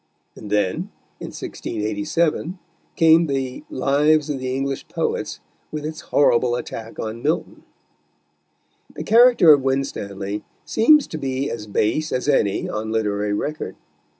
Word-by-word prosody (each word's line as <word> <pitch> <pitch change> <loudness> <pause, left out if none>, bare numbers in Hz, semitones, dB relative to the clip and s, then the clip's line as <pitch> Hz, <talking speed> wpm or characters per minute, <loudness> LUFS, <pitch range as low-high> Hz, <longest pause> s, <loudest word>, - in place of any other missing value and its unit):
And 105 - -10
then, 105 -3 0 0.3
in - - -6
1687, 150 - -2 0.4
came 165 +1 +5
the 135 -2 -3
Lives 150 +3 +2
of 135 - -3
the 130 0 -3
English 135 0 -3
Poets, - - -3 0.3
with 150 -1 -5
its 155 0 -5
horrible 120 -3 +2
attack 115 -2 -7
on 110 +1 -5
Milton. 155 +5 -2 1.3
The - - -5
character 230 -7 +7
of 145 - +3
Winstanley 105 -7 -3 0.2
seems 300 +5 +5
to 155 - -7
be 135 0 -2
as 110 -2 -6
base 155 +10 0
as 125 - -2
any 105 -9 +1
on 110 +1 -4
literary 105 -2 0
record. 125 -4 -3
135 Hz, 130 wpm, -22 LUFS, 110-155 Hz, 1.3 s, character